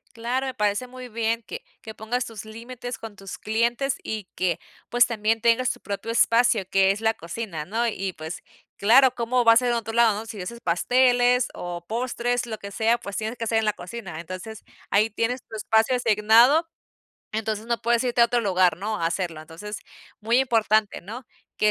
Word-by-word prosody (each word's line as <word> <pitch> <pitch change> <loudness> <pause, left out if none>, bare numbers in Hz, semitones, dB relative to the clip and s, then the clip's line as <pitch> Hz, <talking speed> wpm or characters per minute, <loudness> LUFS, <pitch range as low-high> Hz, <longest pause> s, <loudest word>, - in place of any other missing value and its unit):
Claro, 245 +4 -2
me 260 - -3
parece 210 +1 0
muy 255 0 -10
bien, 230 0 -1
que - - -8 0.2
que 220 - -9
pongas 230 +3 -2
tus 220 -3 -9
límites 240 +3 -7
con 225 -2 -9
tus 195 -1 -8
clientes 235 +5 0
y 215 -3 -4
que 175 -3 0 0.3
pues, 240 0 +5
también 225 -1 0
tengas 235 +2 +3
tu - - -8
propio 200 +3 -5
espacio, 230 -3 +3
que 195 0 +4
es 200 +2 -4
la 225 0 +2
cocina, 170 -3 -6
¿no? 230 +7 -1
Y 195 -3 -3
pues, 160 +2 -7 0.3
claro, 250 +5 +6
¿cómo 240 +1 0
va 230 - +8
a - - +5
ser 250 0 +2
en 240 - +2
otro 225 -1 -3
lado, 230 -3 +4
no? 220 - -7
Si 220 -3 -7
haces 235 +6 -6
pasteles 245 +6 +3
o 175 -1 -6
postres, 245 +1 -1
lo 220 -2 -5
que 200 -1 -9
sea, 225 +3 +2
pues, 200 -4 -7
tienes 220 +3 -3
que - - -4
hacer 225 0 +2
en 220 - -1
la 210 - +2
cocina, 180 -3 -8
entonces, 185 +6 -8 0.3
ahí 210 +2 +3
tienes 235 +4 -1
tu 225 - -9
espacio 220 +3 +2
asignado, 240 +7 +4 0.7
entonces 220 0 -3
no 235 0 -1
puedes 235 +1 +2
irte 245 -1 +1
a 235 - +9
otro 240 0 +1
lugar, 185 -5 +2
¿no?, 210 +4 -3
a 165 - +1
hacerlo. 165 -2 -3
Entonces 170 +7 -8 0.4
muy 230 +3 +2
importante, 220 -4 +2
¿no? 225 +7 -9 0.3
Que 215 - +3
225 Hz, 200 wpm, -24 LUFS, 205-240 Hz, 0.7 s, a